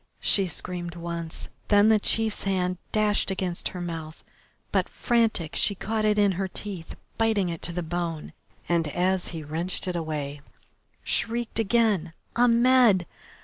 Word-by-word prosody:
she 195 -2 +3
screamed 175 0 -3
once, 170 -1 -5 0.2
then 205 +1 +5
the 220 -1 +5
chief's 220 0 +1
hand 180 -2 0
dashed 210 -2 +2
against 185 -2 -2
her 185 - -6
mouth, 165 -2 -6 0.5
but, - - +1
frantic, 225 -9 0
she 200 - +4
caught 215 +3 -2
it 210 0 +3
in 205 -1 +4
her 190 +1 -2
teeth, 185 -2 -5 0.2
biting 220 -5 +2
it 165 -1 -5
to 175 - -2
the 175 +1 -3
bone, 165 -1 -4 0.3
and 170 -2 +1
as 180 +4 0
he 165 -3 -5
wrenched 170 +6 -3
it 180 - -2
away, 150 -3 -4 0.6
shrieked 235 0 -1
again, 210 -6 +2 0.2
"Ahmed! 240 -5 +5
185 Hz, 145 wpm, -26 LUFS, 170-215 Hz, 0.6 s, then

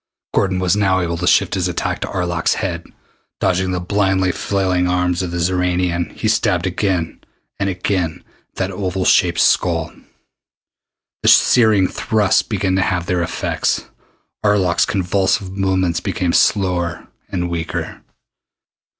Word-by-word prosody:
Gordon 95 -2 +1
was 90 -1 +1
now 100 -2 +2
able 85 -2 -2
to 90 +1 -2
shift - - +3
his - - 0
attack - - -2
to - - -2
Arlok's 85 -3 -1
head. 85 -4 -4 0.5
Dodging 95 0 +1
the 90 -1 -1
blindly 95 0 +1
flailing 95 -2 0
arms 90 0 0
of 90 - -3
the 85 - -4
Xoranian, 90 0 0
he - - -3
stabbed 90 0 +1
again 90 -3 -1 0.4
and 100 -1 0
again 90 -2 -2 0.3
at - - -49
that 95 0 -2
oval 95 -1 -3
shaped 85 -1 +3
skull. - - +2 1.3
The - - +3
searing 110 -6 +5
thrusts 105 -1 +1
began 95 -3 -1
to - - +2
have 90 -2 -1
their 90 0 0
effect. 85 - -2 0.6
Arlok's 100 -4 +2
convulsive 95 +1 0
movements 95 -3 0
became 90 -2 -2
slower 90 -4 +1 0.2
and 90 -3 -2
weaker. 85 -2 -4
90 Hz, 140 wpm, -18 LUFS, 90-95 Hz, 1.3 s, searing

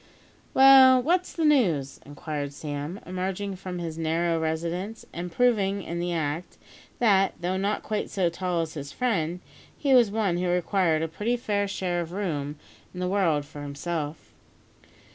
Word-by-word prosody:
"Well, 265 -1 +8
what's 350 +8 +1
the 330 - -1
news?" 180 - +2
inquired 145 0 -5
Sam, 145 +5 -5
emerging 190 +2 -3
from 185 -1 -6
his 165 -2 -5
narrow 165 +1 0
residence, 170 +6 -3
and 175 +1 -5
proving 200 -3 +2
in 170 +1 -4
the 175 0 -2
act, 160 +1 -3 0.4
that, 195 -5 +3
though 180 +2 -1
not 200 +2 -1
quite 215 -1 -2
so 185 -3 +1
tall 175 0 -1
as 160 -1 -4
his 145 -2 -7
friend, 180 -8 -1 0.4
he 280 -3 +2
was 240 -4 +6
one 200 -4 0
who 180 +1 -1
required 175 -2 +1
a - - 0
pretty 210 +9 -1
fair 205 -3 -1
share 180 -3 -2
of 170 0 -7
room 150 -7 -3 0.4
in - - -6
the 180 - -1
world 175 -7 +1
for 145 0 -10
himself. 145 +2 -5
180 Hz, 160 wpm, -26 LUFS, 160-205 Hz, 0.4 s, Well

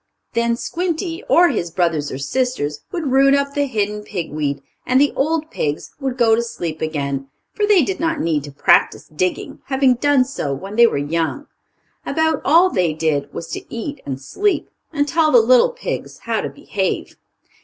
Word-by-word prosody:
Then 235 0 +1
Squinty, 340 +4 -3
or 350 +1 +6
his 175 -9 -2
brothers 165 -4 0
or - - -4
sisters, 150 - -2
would 320 -7 -2
root 275 +1 +5
up 280 0 0
the 285 0 +1
hidden 210 -3 -2
pig 180 -6 -5
weed, 145 -2 -2 0.2
and 255 +1 +2
the 290 +1 +3
old 315 +2 0
pigs 145 0 -3
would 265 -2 -3
go 230 -2 +4
to 225 - +3
sleep 170 -9 -5
again, 140 -3 -2 0.3
for 415 - 0
they 400 -6 +5
did 380 +7 -3
not 325 -2 0
need 155 -4 0
to 145 - -9
practice 140 - +3
digging, 185 +3 -2
having 265 -1 +3
done 270 +1 +3
so 145 - -3
when 195 +8 -8
they 235 +1 +7
were 145 - -1
young. 165 - -2 0.6
About 320 0 0
all 340 +6 +5
they 180 -7 +1
did 150 -3 -1
was 170 - -7
to - - -5
eat 275 +5 -5
and 135 -1 -5
sleep, 390 - -1 0.2
and 290 -2 0
tell 320 0 +2
the - - +7
little - - +5
pigs - - -5
how - - -1
to - - -3
behave. - - -3
245 Hz, 185 wpm, -20 LUFS, -, 0.6 s, they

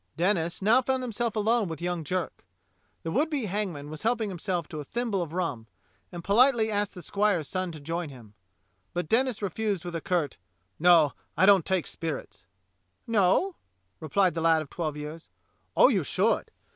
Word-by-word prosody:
Denis 175 0 0
now 230 +5 +5
found 260 0 -1
himself 235 -1 -2
alone 220 0 +2
with 160 -1 -6
young 175 -1 -2
Jerk. 180 +4 -3 0.6
The 165 - -3
would 290 - +1
be 285 -7 -1
hangman 180 -8 -3
was 155 - -7
helping 225 -2 0
himself 175 -2 -2
to 155 - -6
a - - -4
thimble 225 - -2
of 165 -3 -4
rum, 160 -11 -3 0.4
and 175 -1 -7
politely 225 +2 +4
asked 205 -1 -1
the 180 - -8
squire's 200 -4 +1
son 185 -1 -2
to 155 - -9
join 165 +2 -3
him; 120 -6 -13 0.6
but 175 -2 -1
Denis 240 0 +1
refused 200 -1 -2
with 175 -1 -5
a 165 - -2
curt: 170 -5 -1 0.4
"No, 165 -3 +6 0.2
I 185 - +5
don't 195 -4 +5
take 190 -3 +1
spirits." 145 -11 -6 0.6
"No.^" 225 - +2 0.5
replied 180 +4 +2
the 165 - -3
lad 160 -1 +4
of 140 - -17
twelve 155 -4 -3
years. 150 +2 -8 0.5
"Oh, - - +8
you - - +2
should. - - +1
180 Hz, 180 wpm, -27 LUFS, 160-215 Hz, 0.6 s, Oh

